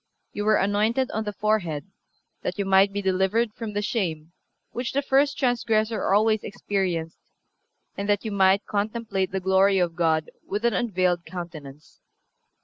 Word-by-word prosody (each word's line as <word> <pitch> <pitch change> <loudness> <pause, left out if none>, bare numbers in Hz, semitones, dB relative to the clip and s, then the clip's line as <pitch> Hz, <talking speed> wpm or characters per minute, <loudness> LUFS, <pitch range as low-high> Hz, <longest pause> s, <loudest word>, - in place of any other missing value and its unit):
You 205 - -3
were 215 0 +4
anointed 215 +6 +1
on 220 +1 -2
the 210 - -2
forehead, 190 -8 -1 0.6
that - - -3
you 200 - -1
might 195 +1 +4
be 205 0 -3
delivered 190 +4 +1
from 220 -2 -6
the 205 0 -1
shame 165 -8 -2 0.4
which 245 0 -4
the 280 +1 0
first 280 +1 +2
transgressor 225 -5 +1
always 215 +1 +3
experienced, 180 -5 -3 0.8
and 200 +1 -4
that 205 +2 +1
you 220 - -2
might 195 0 +3
contemplate 205 -2 -2
the 190 - -1
glory 190 +1 +3
of 175 -2 0
God 160 -2 +1
with 210 +4 -3
an 235 - +3
unveiled 185 -7 0
countenance.... 155 -5 -9
200 Hz, 155 wpm, -25 LUFS, 185-220 Hz, 0.8 s, were